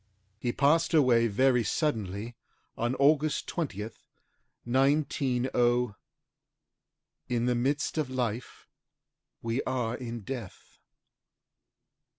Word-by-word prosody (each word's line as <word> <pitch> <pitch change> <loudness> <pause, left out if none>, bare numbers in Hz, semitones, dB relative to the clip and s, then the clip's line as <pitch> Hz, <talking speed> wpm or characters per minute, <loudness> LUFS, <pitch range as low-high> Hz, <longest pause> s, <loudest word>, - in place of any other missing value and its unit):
HE 120 +1 -1
PASSED 160 +4 +3
AWAY 120 -6 +5
VERY 125 +3 +3
SUDDENLY 110 - -2 0.4
ON 120 +2 -1
AUGUST 150 +2 +2
20TH, 110 - -4 0.7
190 125 -3 +1 1.4
"In 120 -1 0
the 125 - +2
midst 140 +6 0
of 145 -4 -1
life 120 -2 -3 0.8
we 115 +3 0
are 120 -3 -1
in 120 -2 -6
death." 115 -3 -8
125 Hz, 90 wpm, -29 LUFS, 115-140 Hz, 1.4 s, AWAY